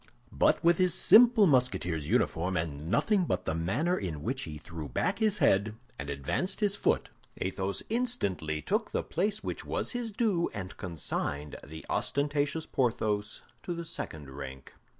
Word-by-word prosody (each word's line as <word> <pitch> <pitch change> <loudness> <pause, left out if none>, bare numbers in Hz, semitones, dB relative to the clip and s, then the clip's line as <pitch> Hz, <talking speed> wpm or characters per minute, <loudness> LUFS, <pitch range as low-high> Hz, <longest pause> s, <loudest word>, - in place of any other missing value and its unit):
But - - +2
with 170 +1 +4
his 180 -1 +4
simple 230 0 +7
Musketeer's 120 - +1
uniform 90 +2 +1
and 80 -1 -3
nothing 185 - +2
but - - -1
the - - 0
manner 110 - 0
in 80 -6 -4
which 130 +5 -2
he 75 -2 -7
threw 80 -1 -8
back 185 - 0
his 215 -2 +2
head 105 - +3 0.2
and 70 +1 -5
advanced 70 - -2
his 205 -2 +2
foot, - - 0 0.3
Athos 95 +1 -2
instantly 100 - -1
took - - 0
the - - -1
place 205 +5 -1
which - - -4
was - - -2
his 245 -2 -2
due 205 -6 +1
and 95 -2 -6
consigned 75 -4 -3
the 80 +2 -9
ostentatious 145 +2 0
Porthos 105 -4 -1 0.2
to 175 - -4
the 170 0 -5
second 75 - -6
rank. 65 -1 -8
105 Hz, 160 wpm, -30 LUFS, -, 0.3 s, simple